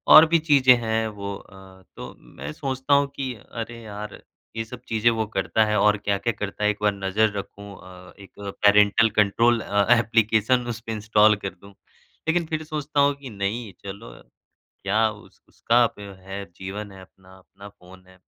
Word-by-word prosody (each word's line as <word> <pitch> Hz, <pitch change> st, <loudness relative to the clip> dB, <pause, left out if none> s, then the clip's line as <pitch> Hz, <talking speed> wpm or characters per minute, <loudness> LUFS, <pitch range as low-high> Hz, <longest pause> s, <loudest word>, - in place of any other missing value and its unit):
और 155 Hz, -, +10 dB
भी 170 Hz, 0 st, +4 dB
चीज़ें 140 Hz, -5 st, +5 dB
हैं, 110 Hz, 0 st, -1 dB
वो 100 Hz, -2 st, -6 dB
अ, 100 Hz, -, -15 dB, 0.4 s
तो -, -, -9 dB
मैं 70 Hz, +3 st, -9 dB
सोचता 135 Hz, +1 st, -2 dB
हूँ 140 Hz, 0 st, +4 dB
कि 130 Hz, -2 st, -3 dB
अरे 115 Hz, +2 st, -8 dB
यार! 105 Hz, -1 st, -8 dB, 0.3 s
ये 115 Hz, -, -2 dB
सब 125 Hz, +1 st, -10 dB
चीज़ें 115 Hz, +1 st, +2 dB
वो 110 Hz, -1 st, -1 dB
करता 100 Hz, +3 st, +1 dB
है 105 Hz, 0 st, 0 dB
और 105 Hz, +1 st, +4 dB
क्या-क्या 105 Hz, +3 st, -1 dB
करता 105 Hz, 0 st, -5 dB
है 105 Hz, -, +4 dB
एक 105 Hz, -, -2 dB
बार 105 Hz, -, +3 dB
नज़र 100 Hz, +2 st, 0 dB
रखूँ 100 Hz, 0 st, -8 dB
अ, 90 Hz, 0 st, -14 dB
एक 100 Hz, -, -14 dB
पैरेंटल 105 Hz, +2 st, +3 dB
कंट्रोल 115 Hz, +3 st, +3 dB
अ, 100 Hz, -1 st, +1 dB
ऐप्लिकेशन 115 Hz, +2 st, +2 dB
उसपे 115 Hz, -1 st, -6 dB
इंस्टॉल 105 Hz, 0 st, +3 dB
कर 95 Hz, -, -1 dB
दूँ। 100 Hz, +2 st, -17 dB, 0.6 s
लेकिन 170 Hz, +1 st, +1 dB
फिर 155 Hz, 0 st, -3 dB
सोचता 150 Hz, -2 st, -3 dB
हूँ 140 Hz, 0 st, +4 dB
कि 140 Hz, -2 st, -10 dB
नहीं, 105 Hz, +1 st, -4 dB
चलो, 95 Hz, -10 st, -8 dB, 0.7 s
क्या 110 Hz, +3 st, +2 dB
उस 105 Hz, -1 st, -16 dB
उसका 120 Hz, +1 st, +2 dB
ब -, -, -11 dB, 0.2 s
है, 95 Hz, +1 st, -7 dB
जीवन 100 Hz, +2 st, -7 dB
है 95 Hz, -1 st, -12 dB
अपना, 95 Hz, 0 st, -18 dB
अपना 100 Hz, +2 st, -15 dB
फ़ोन 90 Hz, -1 st, -18 dB
है। 95 Hz, 0 st, -20 dB
105 Hz, 180 wpm, -24 LUFS, 100-120 Hz, 0.7 s, और